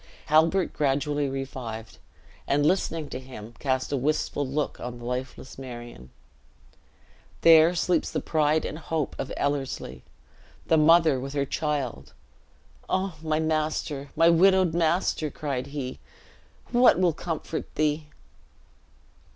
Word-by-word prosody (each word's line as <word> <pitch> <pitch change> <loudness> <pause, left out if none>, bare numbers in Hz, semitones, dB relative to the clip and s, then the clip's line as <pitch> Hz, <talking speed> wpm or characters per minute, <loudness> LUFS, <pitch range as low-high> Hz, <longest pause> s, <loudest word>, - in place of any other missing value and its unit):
Halbert 165 +4 +4
gradually 145 0 0
revived; 130 -5 -6 0.5
and 145 +1 +2
listening 165 -3 0
to - - -5
him, 120 -4 -10
cast 130 -1 -1
a 140 - +1
wistful 145 0 -1
look 145 +2 -2
on 120 0 -6
the 120 - -10
lifeless 125 +1 -5
Marion. 120 - -9 1.3
"There 165 +1 +7
sleeps 170 -1 +1
the - - -2
pride 155 0 +1
and 155 - -5
hope 160 -3 -3
of - - -4
Ellerslie, 135 - -2 0.6
the 160 - +3
mother 155 -2 +5
with 135 +2 -6
her 140 -1 0
child! 130 - -3 0.8
O 190 0 0
my 155 -1 0
master, 155 -3 -1
my 165 - +5
widowed 185 0 +4
master," 165 -2 +1
cried 140 -4 -4
he, 140 -3 -5 0.7
"what 245 0 +5
will 180 -3 +3
comfort 165 0 -5
thee!" 150 0 0
150 Hz, 125 wpm, -26 LUFS, 130-160 Hz, 1.3 s, There